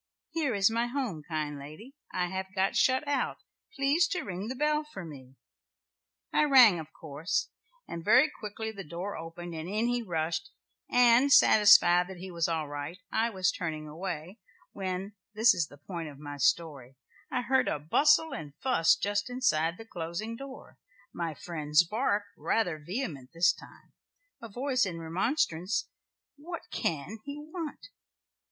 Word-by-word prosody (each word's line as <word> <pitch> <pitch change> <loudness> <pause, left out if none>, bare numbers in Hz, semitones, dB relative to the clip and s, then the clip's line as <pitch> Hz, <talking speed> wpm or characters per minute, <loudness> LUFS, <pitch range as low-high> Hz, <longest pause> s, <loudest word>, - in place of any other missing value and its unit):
"'Here 295 -8 0
is 200 +2 +4
my 230 +1 0
home, 240 - -3
kind 150 -2 -3
lady. 155 - -11 0.2
I 180 - 0
have 190 +1 -4
got 190 0 +1
shut 260 +3 +3
out, 285 - 0 0.4
please 290 +5 +3
to 365 0 -2
ring 190 +2 -5
the 255 - -4
bell 300 +2 +1
for 205 - -9
me.' 135 -4 -11 1.0
"I 300 - +4
rang 250 - +7
of 155 -1 -9
course, 155 +2 -3 0.4
and 170 - -6
very 250 - +6
quickly 220 -5 -6
the 200 -3 -8
door 175 +5 -5
was 165 +1 -6
opened, 175 +1 -8
and 160 +2 -5
in 215 +3 0
he 245 0 0
rushed, 165 +1 -2 0.4
and, 245 +3 +5
satisfied 180 -7 +7
that 190 -1 -9
he 185 +1 -8
was 170 -2 0
all 160 -3 -1
right, 145 +4 -6
I 225 +1 +1
was 185 -4 +1
turning 155 -3 -4
away, 175 +4 -6 0.3
when 190 +1 -4 0.2
this 220 +3 +6
is 170 -4 -1
the 145 - -15
point 165 +1 -6
of 140 - -12
my 145 0 -8
story 140 -2 0 0.4
I 250 - 0
heard 265 +2 +2
a - - 0
bustle 295 - +3
and 150 - -7
fuss 255 -11 +3
just 205 +2 -1
inside 175 -10 +1
the 225 - -10
closing 175 +4 -5
door, 270 +2 -11 0.3
my 165 -3 -3
friend's 155 -1 +1
bark, 210 +2 0
rather 180 -8 0
vehement 160 - -5
this 175 +3 +4
time, - - -16 0.5
a 230 - -8
voice 255 +4 0
in 185 -5 -2
remonstrance 185 - -1 0.5
'what 335 +3 -7
can 170 +8 -2
he 285 0 -6
want?' 315 +4 -7
190 Hz, 165 wpm, -29 LUFS, 160-245 Hz, 1.0 s, rang